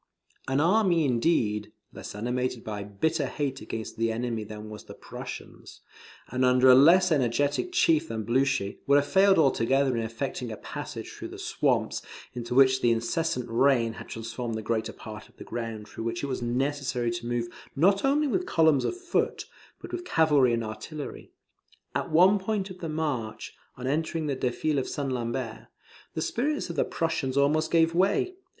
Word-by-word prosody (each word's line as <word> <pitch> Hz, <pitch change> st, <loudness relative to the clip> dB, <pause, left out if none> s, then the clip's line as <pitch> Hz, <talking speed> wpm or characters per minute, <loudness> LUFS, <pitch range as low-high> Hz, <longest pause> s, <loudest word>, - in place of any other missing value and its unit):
An 135 Hz, +1 st, +1 dB
army 175 Hz, -1 st, +3 dB
indeed, 115 Hz, -5 st, +1 dB, 0.2 s
less -, -, -8 dB
animated 125 Hz, +2 st, -2 dB
by 105 Hz, -2 st, -5 dB
bitter 140 Hz, -, -1 dB
hate 135 Hz, -1 st, -3 dB
against 110 Hz, 0 st, -6 dB
the 115 Hz, 0 st, +1 dB
enemy 115 Hz, -1 st, -2 dB
than 105 Hz, 0 st, -8 dB
was 105 Hz, 0 st, -9 dB
the -, -, -11 dB
Prussians, -, -, -9 dB, 0.5 s
and 130 Hz, +1 st, -1 dB
under 125 Hz, +1 st, +5 dB
a -, -, +9 dB
less 170 Hz, +7 st, +6 dB
energetic 145 Hz, -, +1 dB
chief 165 Hz, -, +3 dB
than 110 Hz, -5 st, -4 dB
Blucher, 125 Hz, -3 st, +1 dB
would 140 Hz, -, +5 dB
have 145 Hz, 0 st, +4 dB
failed 195 Hz, +3 st, +4 dB
altogether 135 Hz, -2 st, +3 dB
in 115 Hz, -, 0 dB
effecting 115 Hz, +2 st, -4 dB
a 110 Hz, -, -6 dB
passage -, -, -7 dB
through -, -, -7 dB
the -, -, -10 dB
swamps, -, -, 0 dB, 0.3 s
into 120 Hz, 0 st, -4 dB
which 130 Hz, -1 st, +5 dB
the 120 Hz, -, +4 dB
incessant 125 Hz, +4 st, 0 dB
rain 120 Hz, -1 st, +3 dB
had -, -, -10 dB
transformed 115 Hz, +1 st, -5 dB
the 110 Hz, -, -4 dB
greater 110 Hz, 0 st, -1 dB
part 110 Hz, -1 st, -10 dB
of -, -, -27 dB
the -, -, -9 dB
ground 115 Hz, -2 st, -5 dB
through 115 Hz, -, -7 dB
which 115 Hz, +2 st, -3 dB
it -, -, -1 dB
was 130 Hz, -2 st, -3 dB
necessary 125 Hz, 0 st, -1 dB
to 120 Hz, 0 st, -5 dB
move 120 Hz, -1 st, -1 dB, 0.3 s
not 195 Hz, +7 st, +3 dB
only 285 Hz, +3 st, +3 dB
with 360 Hz, +7 st, -1 dB
columns 160 Hz, -, +4 dB
of 360 Hz, -, -2 dB
foot, 365 Hz, -1 st, -1 dB, 0.3 s
but -, -, -10 dB
with 355 Hz, -, -4 dB
cavalry 150 Hz, -, +3 dB
and 115 Hz, 0 st, 0 dB
artillery. 140 Hz, +7 st, -7 dB, 0.6 s
At -, -, -2 dB
one 185 Hz, +6 st, +5 dB
point 195 Hz, 0 st, -2 dB
of 185 Hz, -, -10 dB
the 165 Hz, -, -4 dB
march, 145 Hz, -8 st, -3 dB, 0.2 s
on 125 Hz, -, -6 dB
entering 160 Hz, +3 st, -1 dB
the 145 Hz, -2 st, -1 dB
defile 135 Hz, +4 st, 0 dB
of 130 Hz, -, -3 dB
St. 140 Hz, -2 st, -3 dB
Lambert, 120 Hz, -1 st, -4 dB, 0.5 s
the 160 Hz, -, -1 dB
spirits 280 Hz, -, -1 dB
of -, -, -8 dB
the -, -, +2 dB
Prussians 140 Hz, -5 st, -2 dB
almost 150 Hz, +3 st, +3 dB
gave 165 Hz, 0 st, +3 dB
way. 200 Hz, -, +2 dB
135 Hz, 180 wpm, -27 LUFS, 115-160 Hz, 0.6 s, a